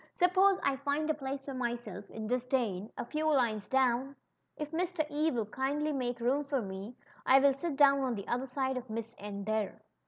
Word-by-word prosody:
Suppose 375 +2 +4
I 275 -1 +2
find 285 +2 -1
a - - +2
place 275 -2 -5
for 275 - -6
myself 240 -5 -4
in 220 -1 -6
disdane^ 240 -5 0
a - - -3
few 305 +5 -1
lines 225 -7 +1
down? 265 +1 +2 0.4
If 300 -1 -4
Mr. 345 -1 0
E 305 +2 +2
will 235 -7 -1
kindly 280 +7 -1
make 245 -3 -2
room 260 +5 +1
for 280 -1 -1
me 195 +2 -6 0.3
I 265 - +6
will 275 0 +5
sit 290 +2 -3
down 275 -1 +6
on 260 -3 0
the 200 - -6
other 250 +3 -1
side 265 0 -1
of 250 -1 -6
Miss 225 +1 -4
N, 200 0 -5
there." 215 -1 -2
265 Hz, 205 wpm, -32 LUFS, 230-285 Hz, 0.4 s, I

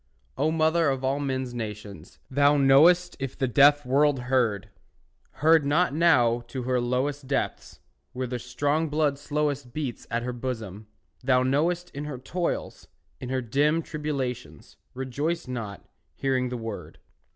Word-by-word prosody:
O 145 +4 +1
mother 160 0 +2
of 135 -1 -2
all 135 +2 0
men's 130 -3 -2
nations, 105 -6 -7
Thou 145 +2 +3
knowest 165 +7 +5
if 135 -1 -5
the 135 - 0
deaf 145 +3 +5
world 140 +1 +2
heard! 120 -6 0 0.8
Heard 160 -1 +6
not 145 +3 +2
now 125 -8 +3
to 130 0 -5
her 125 0 0
lowest 130 +3 -1
Depths, 135 0 -3 0.3
where 130 0 -3
the 125 0 -4
strong 145 +6 -1
blood 145 -2 0
slowest 145 -4 -2
Beats 140 -5 -5
at 115 +1 -1
her 125 0 -3
bosom, 110 -5 -6 0.4
thou 125 -1 +3
knowest, 170 +7 0
In 145 +1 -6
her 145 -3 -5
toils, 170 +7 -4 0.3
in 125 - -6
her 130 0 -1
dim 145 +7 +1
tribulations, 130 - -5 0.2
Rejoiced 140 +6 -3
not, 115 -6 -6 0.3
hearing 130 -2 0
the 125 - -4
word. 115 -2 -7
135 Hz, 150 wpm, -26 LUFS, 125-150 Hz, 0.8 s, Heard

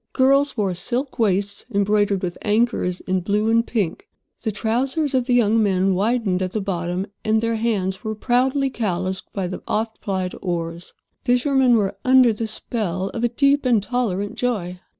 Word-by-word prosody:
Girls 275 +1 +3
wore 200 -4 0
silk 250 +10 -3
waists 200 -2 0
embroidered 205 -1 +1
with 175 -1 -2
anchors 210 -4 0
in 185 0 -1
blue 210 +4 0
and 230 +1 +3
pink. 200 -9 -2 0.3
The 220 - -1
trousers 260 +8 -1
of 255 -2 +2
the 250 -1 +2
young 225 -1 +3
men 195 -2 +2
widened 200 -1 0
at 185 -1 -2
the 215 - 0
bottom, 180 -1 -2 0.2
and 220 0 +2
their 230 0 0
hands 200 -4 -1
were 220 -1 -3
proudly 260 +4 +1
calloused 190 -5 -3
by 195 -2 -3
the 180 +1 -5
oft 220 +1 -2
plied 185 -2 -2
oar. 170 -2 -2 0.5
Fishermen 250 0 +3
were 200 -3 -1
under 255 -2 +5
the 220 +1 -3
spell 195 -4 -3
of 230 - -5
a 240 - +3
deep 280 +4 +2
and 235 -6 +2
tolerant 205 -5 -1
joy. 185 -8 -2
215 Hz, 170 wpm, -22 LUFS, 190-245 Hz, 0.5 s, under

